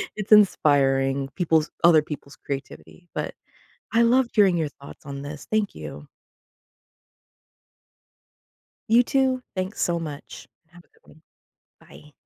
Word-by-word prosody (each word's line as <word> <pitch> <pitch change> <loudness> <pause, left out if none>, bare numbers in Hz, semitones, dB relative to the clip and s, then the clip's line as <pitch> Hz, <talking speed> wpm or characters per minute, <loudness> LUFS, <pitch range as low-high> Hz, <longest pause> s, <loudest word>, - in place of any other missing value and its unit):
it's 210 0 -6
inspiring 135 -9 +3
people's 160 -3 +1
other 170 -2 +7
people's 145 -2 -9
creativity, 140 +6 -8
but - - -4 0.6
I 230 +1 +4
loved 240 +1 +3
hearing 195 -5 +4
your 160 -3 -1
thoughts 140 -1 -15
on 140 -1 -7
this. 145 0 -8
Thank 215 -2 0
you. 75 -1 -9 2.8
You 230 +2 +6
too, 260 0 +1
thanks 185 +2 -4
so 170 -1 +1
much. 155 -4 -8 0.2
Have 175 +1 -18
a - - -34
good - - -22
one. 155 - -23 0.6
Bye. 150 - -17
160 Hz, 125 wpm, -24 LUFS, 140-210 Hz, 2.8 s, other